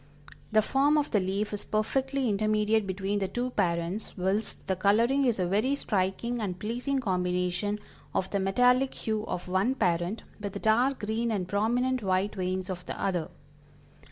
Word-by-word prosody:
The 215 Hz, 0 st, +4 dB
form 280 Hz, +6 st, +3 dB
of 295 Hz, -1 st, 0 dB
the 210 Hz, -, +3 dB
leaf 195 Hz, +3 st, -1 dB
is 205 Hz, -, -4 dB
perfectly 265 Hz, +5 st, 0 dB
intermediate 215 Hz, 0 st, +2 dB
between 195 Hz, +2 st, -1 dB
the 195 Hz, -, 0 dB
two 245 Hz, +5 st, -2 dB
parents, 175 Hz, 0 st, -1 dB
whilst 195 Hz, +4 st, -1 dB
the 190 Hz, -, 0 dB
coloring 230 Hz, +9 st, +3 dB
is 240 Hz, -3 st, +2 dB
a 185 Hz, -, +1 dB
very 215 Hz, +10 st, +1 dB
striking 220 Hz, +1 st, -1 dB
and 185 Hz, -4 st, -2 dB
pleasing 245 Hz, +8 st, -2 dB
combination 180 Hz, -2 st, 0 dB, 0.3 s
of 190 Hz, -, 0 dB
the 200 Hz, -, +1 dB
metallic 250 Hz, +7 st, +3 dB
hue 220 Hz, -1 st, -2 dB
of 180 Hz, -, -4 dB
one 190 Hz, +8 st, +1 dB
parent, 175 Hz, 0 st, 0 dB, 0.2 s
with 200 Hz, -2 st, -5 dB
the 200 Hz, -, -4 dB
dark 245 Hz, +6 st, +2 dB
green 225 Hz, +2 st, 0 dB
and 195 Hz, -5 st, -1 dB
prominent 240 Hz, +6 st, +1 dB
white 190 Hz, 0 st, +1 dB
veins 185 Hz, -1 st, -2 dB
of 180 Hz, -2 st, -5 dB
the -, -, -5 dB
other." 175 Hz, -5 st, -1 dB
210 Hz, 170 wpm, -28 LUFS, 185-235 Hz, 0.3 s, The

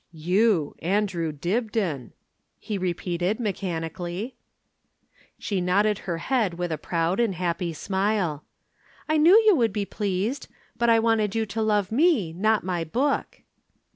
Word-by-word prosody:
"You, 180 Hz, +1 st, +1 dB
Andrew 180 Hz, -2 st, 0 dB
Dibdin!" 180 Hz, -, -2 dB, 0.4 s
he 210 Hz, -3 st, -4 dB
repeated 180 Hz, +2 st, -1 dB
mechanically. 185 Hz, -, -4 dB, 1.0 s
She 195 Hz, -3 st, -2 dB
nodded 200 Hz, +3 st, +2 dB
her 170 Hz, -, -1 dB
head 220 Hz, -2 st, 0 dB
with 175 Hz, 0 st, -3 dB
a 160 Hz, -, -1 dB
proud 170 Hz, +4 st, -1 dB
and 225 Hz, -6 st, +1 dB
happy 175 Hz, 0 st, -2 dB
smile. 190 Hz, -2 st, -1 dB, 0.6 s
"I 310 Hz, -, +2 dB
knew 340 Hz, +8 st, +7 dB
you 425 Hz, -3 st, +6 dB
would 230 Hz, -7 st, +2 dB
be 205 Hz, 0 st, -2 dB
pleased 205 Hz, +6 st, -2 dB, 0.3 s
but 235 Hz, 0 st, +1 dB
I 230 Hz, -, +6 dB
wanted 225 Hz, -2 st, +1 dB
you 225 Hz, -1 st, +1 dB
to 220 Hz, +2 st, -4 dB
love 210 Hz, -2 st, +1 dB
me, 245 Hz, -, +2 dB
not 215 Hz, +5 st, +1 dB
my 180 Hz, -2 st, -2 dB
book." 265 Hz, -, -1 dB
195 Hz, 140 wpm, -25 LUFS, 175-225 Hz, 1.0 s, knew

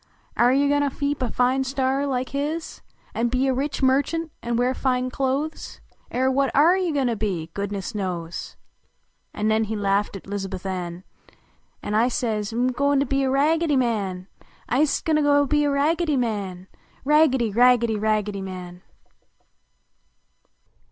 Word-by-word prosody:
Air 240 Hz, +1 st, +4 dB
you 280 Hz, +2 st, +3 dB
go 290 Hz, 0 st, +2 dB
to 285 Hz, -1 st, +1 dB
keep 285 Hz, +1 st, -3 dB
a 250 Hz, -, 0 dB
fine 255 Hz, +3 st, +1 dB
store 270 Hz, +1 st, 0 dB
like 255 Hz, -2 st, -2 dB
his 300 Hz, +4 st, -4 dB, 0.3 s
An 235 Hz, +1 st, 0 dB
be 255 Hz, +2 st, 0 dB
a 265 Hz, -, +2 dB
rich 275 Hz, +4 st, -2 dB
merchtmt 285 Hz, +5 st, +1 dB
an 235 Hz, 0 st, -2 dB
wear 245 Hz, +2 st, +1 dB
fine 255 Hz, -1 st, -1 dB
clothes? 275 Hz, +4 st, -3 dB, 0.3 s
I -, -, -4 dB
.r 260 Hz, 0 st, +3 dB
what 275 Hz, 0 st, +2 dB
oh 315 Hz, +5 st, +6 dB
you 370 Hz, -3 st, 0 dB
go 280 Hz, -3 st, 0 dB
to 235 Hz, -2 st, 0 dB
be, 185 Hz, -7 st, -3 dB
goodness 200 Hz, 0 st, -4 dB
knows!" 175 Hz, -5 st, -4 dB, 0.8 s
An 210 Hz, -, -2 dB
nen 220 Hz, 0 st, +2 dB
he 220 Hz, +1 st, -4 dB
laughed 200 Hz, 0 st, 0 dB
at 195 Hz, -, -9 dB
Lizabuth 195 Hz, -2 st, -5 dB
Ann, 180 Hz, -2 st, -4 dB, 0.8 s
An 205 Hz, -, -3 dB
T 225 Hz, +4 st, +3 dB
say? 225 Hz, -4 st, -1 dB
" -, -, -6 dB
M" 245 Hz, +3 st, +1 dB
go 280 Hz, +3 st, +1 dB
to 275 Hz, -, +2 dB
be 275 Hz, +1 st, 0 dB
a -, -, +1 dB
Ragged}" 310 Hz, +5 st, +2 dB
Man! 200 Hz, -7 st, -1 dB, 0.4 s
I 245 Hz, -, 0 dB
m -, -, +4 dB
ist 305 Hz, -, +1 dB
go 320 Hz, -, +1 dB
to 290 Hz, -1 st, +4 dB
be 295 Hz, +1 st, +2 dB
a -, -, +2 dB
nice 280 Hz, -, 0 dB
Raggedy 310 Hz, +1 st, +1 dB
Man!" 200 Hz, -6 st, -3 dB, 0.4 s
Raggedy! 270 Hz, -6 st, +3 dB
Raggedy! 235 Hz, 0 st, +4 dB
Raggedv 210 Hz, -2 st, -1 dB
Man! 180 Hz, -2 st, -8 dB
250 Hz, 175 wpm, -23 LUFS, 210-280 Hz, 0.8 s, oh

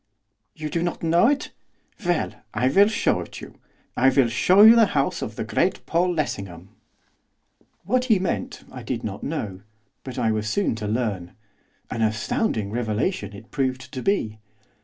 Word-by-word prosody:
'You 155 Hz, -1 st, -5 dB
do 170 Hz, -, -1 dB
not 175 Hz, 0 st, -3 dB
know 170 Hz, +6 st, +4 dB
it? 290 Hz, +2 st, 0 dB, 0.5 s
Well! 175 Hz, -10 st, 0 dB, 0.2 s
I 130 Hz, -, +2 dB
will 200 Hz, +9 st, +5 dB
show 220 Hz, -, +1 dB
it -, -, -8 dB
you, -, -, -12 dB, 0.4 s
I 135 Hz, +2 st, +5 dB
will 130 Hz, -2 st, +3 dB
show 185 Hz, -, +6 dB
the 230 Hz, -2 st, +6 dB
house 140 Hz, -, 0 dB
of -, -, -5 dB
the -, -, -3 dB
great -, -, 0 dB
Paul 175 Hz, +2 st, +1 dB
Lessingham.' 100 Hz, -, -4 dB, 1.1 s
What 250 Hz, +7 st, +1 dB
he 225 Hz, -5 st, +4 dB
meant 185 Hz, -1 st, -3 dB
I -, -, -8 dB
did -, -, -4 dB
not -, -, -5 dB
know; 95 Hz, -3 st, -4 dB, 0.4 s
but 130 Hz, -1 st, -8 dB
I 115 Hz, -3 st, +1 dB
was 110 Hz, 0 st, -1 dB
soon 200 Hz, -, +1 dB
to 105 Hz, -1 st, -4 dB
learn, 105 Hz, -6 st, -2 dB, 0.6 s
an 115 Hz, -, -3 dB
astounding 110 Hz, -, 0 dB
revelation 110 Hz, -, -2 dB
it 100 Hz, +3 st, -13 dB
proved 130 Hz, -2 st, -2 dB
to 130 Hz, -, -4 dB
be. 110 Hz, -, -1 dB
130 Hz, 165 wpm, -24 LUFS, 110-180 Hz, 1.1 s, show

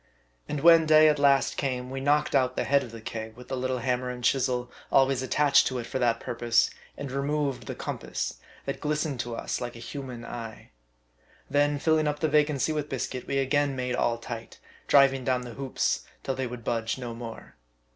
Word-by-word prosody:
And 145 Hz, -, -2 dB
when 165 Hz, 0 st, +7 dB
day 155 Hz, 0 st, +7 dB
at 150 Hz, -1 st, +1 dB
last 140 Hz, -1 st, +3 dB
came^ 125 Hz, -2 st, -2 dB
we 135 Hz, 0 st, -4 dB
knocked 145 Hz, +2 st, +2 dB
out 130 Hz, -2 st, +2 dB
the -, -, 0 dB
head 140 Hz, 0 st, +3 dB
of 125 Hz, -, -7 dB
the 115 Hz, -1 st, -9 dB
keg 110 Hz, 0 st, -6 dB
with 125 Hz, -, -12 dB
the 130 Hz, -, -2 dB
little 130 Hz, 0 st, -1 dB
hammer 125 Hz, +1 st, -1 dB
and 125 Hz, 0 st, -6 dB
chisel, 125 Hz, -1 st, +1 dB, 0.2 s
always 135 Hz, -1 st, +4 dB
attached 145 Hz, +2 st, +4 dB
to 130 Hz, -, -2 dB
it 120 Hz, -, -4 dB
for 130 Hz, -, -3 dB
that 115 Hz, -2 st, +2 dB
purpose, 120 Hz, -1 st, +1 dB, 0.3 s
and 140 Hz, -2 st, -5 dB
removed 140 Hz, 0 st, -1 dB
the -, -, -4 dB
compass, -, -, -4 dB, 0.3 s
that -, -, -4 dB
glis 150 Hz, +1 st, 0 dB
tened 140 Hz, -5 st, -4 dB
to 120 Hz, -1 st, -3 dB
us -, -, -3 dB
like 120 Hz, -1 st, -5 dB
a -, -, -9 dB
human 125 Hz, -2 st, -7 dB
eye. 115 Hz, -2 st, -8 dB, 0.8 s
Then 145 Hz, +1 st, +3 dB
filling 155 Hz, +1 st, +2 dB
up 150 Hz, 0 st, 0 dB
the 155 Hz, -, 0 dB
vacancy 150 Hz, 0 st, +2 dB
with 150 Hz, -1 st, -3 dB
biscuit, 130 Hz, -1 st, -4 dB
we 140 Hz, -, -1 dB
again 140 Hz, +1 st, +1 dB
made 125 Hz, -1 st, -2 dB
all 115 Hz, 0 st, +1 dB
tight, 115 Hz, -1 st, -8 dB, 0.3 s
driving 135 Hz, -2 st, +5 dB
down 125 Hz, -1 st, +1 dB
the 120 Hz, -1 st, -8 dB
hoops 130 Hz, -, -1 dB, 0.2 s
till 135 Hz, -, -1 dB
they 130 Hz, -1 st, -2 dB
would 120 Hz, -1 st, -8 dB
budge 115 Hz, 0 st, -1 dB
no 120 Hz, -2 st, -5 dB
more. 115 Hz, -1 st, -9 dB
130 Hz, 205 wpm, -27 LUFS, 120-145 Hz, 0.8 s, when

